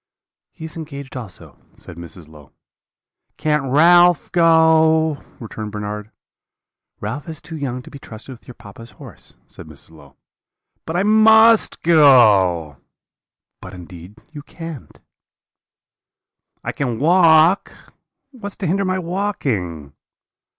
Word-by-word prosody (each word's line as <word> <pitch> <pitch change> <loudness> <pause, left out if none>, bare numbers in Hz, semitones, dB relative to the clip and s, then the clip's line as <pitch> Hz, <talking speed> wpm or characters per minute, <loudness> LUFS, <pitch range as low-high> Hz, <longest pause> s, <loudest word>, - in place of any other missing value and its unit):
"'He 160 - -11
is 160 - -10
engaged 140 -5 -9
also,' 110 -8 -11 0.2
said 90 - -14
Mrs. 85 -1 -12
Low. 75 -3 -18 0.8
"'Can't 150 -2 -1
Ralph 175 +3 +4
go?' 160 -2 +3 0.2
returned 110 -2 -8
Bernard. 105 0 -7 0.9
"'Ralph 130 +10 -6
is 160 -2 -8
too 165 - -11
young 130 -4 -5
to - - -15
be 140 - -11
trusted 115 +2 -12
with 120 - -19
your 125 - -12
papa's 115 +3 -14
horse,' - - -15
said - - -13
Mrs. - - -14
Low. 70 -4 -18 0.7
"'But 160 - -5
I 180 - 0
must 220 +1 +4
go.' 105 - +3 0.8
"'But - - -11
indeed 90 +3 -13
you 150 -2 -10
can't.' 165 -1 -11 1.6
"'I - - -4
can 125 -5 -4
walk. 165 +2 +3 0.6
What's 205 -7 -9
to 195 - -6
hinder 190 +4 -1
my 185 0 -1
walking?' 135 - -4
145 Hz, 120 wpm, -18 LUFS, 105-165 Hz, 1.6 s, Ralph